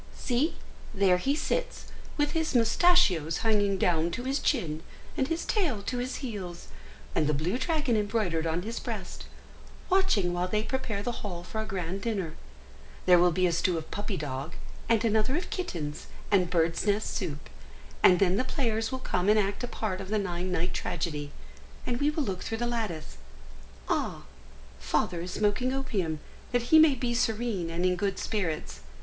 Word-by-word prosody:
See, 265 +6 0 0.4
there 190 -2 +4
he 275 +9 +1
sits, - - -2 0.3
with 295 -1 +2
his 320 -4 -1
moustachios 225 - +4
hanging 205 -3 +3
down 170 -2 +2
to 245 - -3
his 270 +2 0
chin, 160 - 0 0.3
and 265 - +1
his 330 +2 -2
tail 300 - 0
to 245 +4 -2
his 255 +1 -2
heels, 185 -7 -6 0.4
and 150 - +2
the 150 - +2
blue 175 - -1
dragon 295 -4 +1
embroidered 205 -6 0
on 165 +2 -1
his 230 +3 -4
breast, - - -6 0.7
watching 230 - +3
while 175 +1 0
they 210 +3 0
prepare 225 -5 -2
the 245 0 -3
hall 175 -4 -5
for 220 +4 -4
a - - -4
grand 190 -1 -3
dinner. 195 -8 -2 0.7
There 180 -1 +7
will 175 0 +5
be 185 +2 +2
a 175 - +3
stew 170 +1 +1
of 160 - -7
puppy 205 -1 -3
dog, 145 +2 -4 0.4
and 230 0 +3
another 220 +4 +2
of 355 - -5
kittens, 160 - -4 0.2
and 185 -4 +4
birds 165 +3 +1
nest 205 +1 +1
soup; 155 -8 -3 0.5
and 180 - +7
then 185 0 +3
the 255 - +2
players 225 -4 -1
will 260 - -2
come 190 -7 0
and 215 - +6
act 200 +2 0
a - - -1
part 210 -5 -3
of 190 - -7
the 215 - +1
nine 180 -2 -2
night 180 0 0
tragedy, 150 -4 -3 0.5
and 240 +1 -2
we 290 - +4
will 300 0 -1
look 190 -7 -3
through 225 - -3
the 240 - -1
lattice. 220 -10 -3 0.7
Ah! - - -1 0.6
Father 175 -2 0
is 180 - -5
smoking 215 +5 +1
opium, 200 - -1 0.3
that 245 +3 0
he 315 - +10
may 310 -3 +7
be 240 -1 -1
serene 225 -6 0
and 170 +2 -1
in 180 0 +3
good 195 +2 -1
spirits! 180 -8 -2
205 Hz, 180 wpm, -29 LUFS, 175-245 Hz, 0.7 s, he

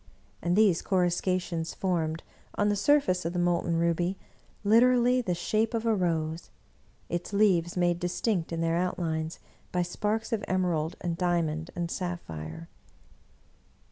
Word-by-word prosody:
And 175 +1 +1
these 205 -5 +4
coruscations 180 -2 0
formed, 165 -4 -1 0.3
on 205 0 +2
the 205 - +2
surface 200 -5 +3
of 165 +1 -2
the - - -3
molten 175 -1 +1
ruby, 170 +3 +1 0.5
literally 245 +3 +5
the 180 -7 -1
shape 215 +6 0
of 225 0 -2
a 225 - +3
rose, 165 -4 -1 0.6
its 175 +4 -4
leaves 185 -5 +3
made 175 -1 +2
distinct 180 0 -1
in 165 0 -2
their 165 0 +1
outlines 165 -3 -2 0.3
by 180 0 +1
sparks 215 +5 -2
of 220 - -1
emerald 175 -4 0
and 170 -2 -3
diamond 165 -3 0
and 175 -1 -3
sapphire. 80 - -5
175 Hz, 140 wpm, -28 LUFS, 165-200 Hz, 0.6 s, literally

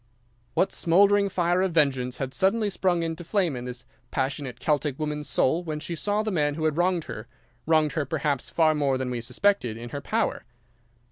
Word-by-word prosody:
"What 190 - +2
smouldering 200 +4 +4
fire 175 -1 +1
of 190 -2 0
vengeance 130 -5 +1
had 135 -1 -4
suddenly 205 +2 +2
sprung 180 -3 +1
into 165 +1 -4
flame 175 -4 0
in 125 0 -6
this 125 0 -7 0.2
passionate 135 -2 -3
Celtic 145 0 0
woman's 150 -2 -3
soul 165 +7 +2
when 155 -3 -4
she 160 +3 -4
saw 205 +5 0
the 215 - -2
man 145 -5 +1
who 160 0 -2
had 155 -2 +1
wronged 175 0 +1
her—wronged 125 +8 -2
her, 150 0 -1
perhaps, 140 -2 -1
far 160 -2 +3
more 140 -3 +1
than 130 -1 -3
we 120 -1 -3
suspected—in 120 - 0
her 140 +2 -5
power? - - -1
155 Hz, 185 wpm, -26 LUFS, 135-175 Hz, 0.2 s, smouldering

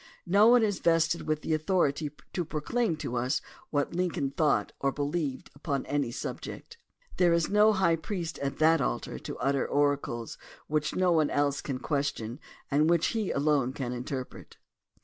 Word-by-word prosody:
No 200 +5 +5
one 240 0 +6
is 205 -3 0
vested 165 0 +2
with 155 0 -1
authority 155 -2 +1 0.2
to 175 - -1
proclaim 165 +5 -1
to 125 - -4
us 125 +4 0 0.3
what 145 +1 -1
Lincoln 170 -6 -1
thought 150 +1 +1
or 140 - +1
believed 145 -1 -3
upon 140 -1 -3
any 145 -3 -1
subject. 465 - -7 0.4
There 175 -2 +4
is 170 +2 +1
no 210 +1 +6
high 190 -5 +2
priest 170 0 -4
at 140 -1 -3
that 160 0 +4
altar - - -2
to - - -7
utter 140 -1 0
oracles 140 -5 -1 0.3
which 155 0 -1
no 185 -1 +3
one 155 -3 +3
else 145 0 +1
can 135 -3 -3
question 135 -4 -2 0.3
and 150 +3 +3
which 170 -1 +3
he 220 -4 -1
alone 140 -3 +1
can 125 -3 -4
interpret. 125 +1 -6
150 Hz, 165 wpm, -29 LUFS, 140-170 Hz, 0.4 s, one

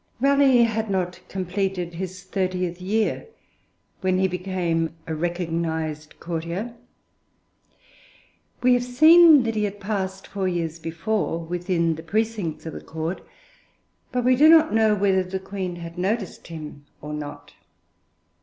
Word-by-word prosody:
Raleigh 275 -2 +5
had 220 -1 -1
not 180 -2 -1
completed 185 -1 -2
his 185 +1 -6
thirtieth 185 -2 -2
year 215 - -1 0.7
when 185 -1 +1
he 190 0 +3
became 180 -3 -2
a 160 - -4
recognised 160 -2 -3
courtier. 170 +7 -4 1.9
We 250 0 +6
have 245 0 +2
seen 310 +4 +7
that 230 -1 -1
he 210 -1 0
had 205 0 -5
passed, 190 -2 -3
four 195 -2 -3
years 170 -2 -2
before, 165 +3 -2
within 170 0 -1
the 160 - -7
precincts 205 -3 -2
of 160 - -5
the - - -7
Court, 160 +3 -4 0.9
but 250 -1 -1
we 255 0 +5
do 300 +5 +6
not 320 -4 +6
know 220 -1 +4
whether 195 -2 +2
the 185 +1 -4
Queen 190 -2 -5
had 170 0 -8
noticed 200 +1 -2
him 155 -3 -8 0.2
or 150 0 -7
not. 150 -1 -7
185 Hz, 135 wpm, -24 LUFS, 170-220 Hz, 1.9 s, seen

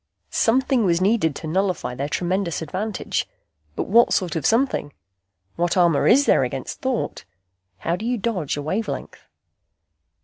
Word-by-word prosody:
Something 255 +1 +2
was 170 -3 +2
needed 185 -6 +2
to 160 - -6
nullify 185 -5 -1
their 140 +3 -3
tremendous 175 -1 -1
advantage. 190 +6 -3 0.5
But - - -1
what 235 +4 +4
sort 180 -4 0
of 160 - 0
something? 225 - +1 0.6
What 175 +1 0
armor 170 -5 +4
is 280 +2 +5
there - - +4
against - - -5
thought? 260 - -2 0.5
How 165 - -1
do 205 +5 -6
you 245 0 0
dodge 190 -11 -2
a 145 - -4
wavelength? 200 +8 -3
185 Hz, 145 wpm, -22 LUFS, 165-225 Hz, 0.6 s, is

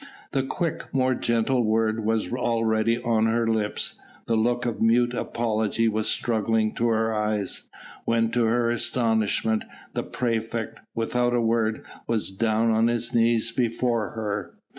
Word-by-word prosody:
The 135 - +1
quick, 160 +5 -3
more 130 -1 +2
gentle 120 +1 +1
word 110 0 +1
was 110 +1 0
already 115 -1 +1
on 110 -1 +2
her 115 +1 +1
lips, 110 -2 -1 0.3
the 115 - 0
look 120 +2 +1
of 120 -2 -3
mute 120 +2 +3
apology 115 -2 0
was 110 -1 0
struggling 110 -1 +1
to 120 - 0
her 110 0 +1
eyes, 105 -2 -1 0.3
when 115 0 +1
to 120 0 +2
her 115 +1 +2
astonishment 115 -2 +1 0.3
the - - -1
praefect, 115 -1 -3 0.2
without 120 +1 0
a - - +2
word, 115 -1 0 0.2
was 110 -4 0
down 110 +3 +1
on 110 +1 +3
his 120 +1 0
knees 115 -1 +3
before 115 -2 0
her. 105 -5 -4
115 Hz, 145 wpm, -25 LUFS, 110-120 Hz, 0.3 s, mute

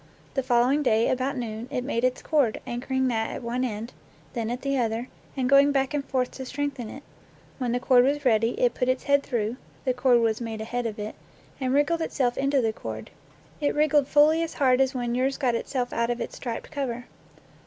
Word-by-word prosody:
The 270 - +1
following 250 +3 +3
day, 225 -5 +3
about 260 +2 -1
noon, 230 -1 -4
it 250 - -2
made 245 -3 -1
its 255 0 0
cord, 280 -8 +2
anchor 240 +2 -5
ing 260 0 +2
that 225 -2 0
at - - -6
one 240 +2 -1
end, 230 0 -4 0.4
then 230 -2 -2
at 245 +2 -4
the 275 0 0
other, 235 0 -1 0.3
and 255 -1 +1
going 275 +2 +6
back 270 0 +1
and 290 -1 0
forth 255 -2 -1
to 265 - -7
strengthen 280 -5 -3
it. 275 +5 -9 0.6
When 250 -2 -1
the 245 - +1
cord 255 -1 +5
was 285 +2 0
ready, 230 -1 +2
it 245 -2 +3
put 250 +1 0
its 255 0 0
head 280 0 +3
through 235 -3 -2 0.3
(the 255 - +2
cord 250 -1 +4
was 225 0 +1
made 225 -2 -4
ahead 240 +2 -2
of 215 - -6
it) 210 0 -5 0.5
and 260 -2 -1
wriggled 290 +5 +2
itself 255 -6 0
into 275 0 +2
the 225 -2 0
cord; - - -7 0.5
it 290 -2 0
wriggled 295 -2 +3
fully 300 +3 +5
as 330 - -3
hard 260 -2 +3
as 265 +1 +1
when 240 -1 -1
yours 260 +2 +1
got 255 -4 +1
itself 245 +1 -2
out 235 0 0
of 240 0 -1
its - - -5
striped 235 -3 -5
cover. 250 -5 -3
255 Hz, 220 wpm, -26 LUFS, 235-275 Hz, 0.6 s, going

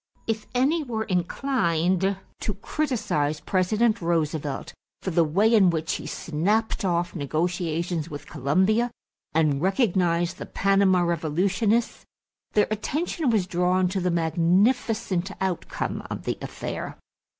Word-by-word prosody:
If 220 -1 -2
any 285 +7 +3
were 230 -6 -3
inclined 185 -2 0 0.2
to - - -2
criticize 215 - -1
President 215 +4 +1
Roosevelt 155 -4 -1 0.3
for 190 - -2
the 170 0 +4
way 200 +9 +3
in 200 -5 +6
which 160 -2 -1
he - - -8
snapped 205 +10 -1
off 175 -2 0
negotiations 165 +1 -1
with 145 -2 -7
Colombia 185 - +2 0.5
and 150 -3 +2
recognized 180 -4 +1
the - - -6
Panama 195 -2 +3
revolutionists, 185 +7 0 0.5
their 210 - +4
attention 295 +7 -1
was 215 -5 +2
drawn 180 +1 +2
to 190 0 -2
the 180 - +1
magnificent 185 +4 +1
outcome 190 -3 -2
of - - -5
the - - -3
affair. - - -5
185 Hz, 120 wpm, -25 LUFS, 170-215 Hz, 0.5 s, in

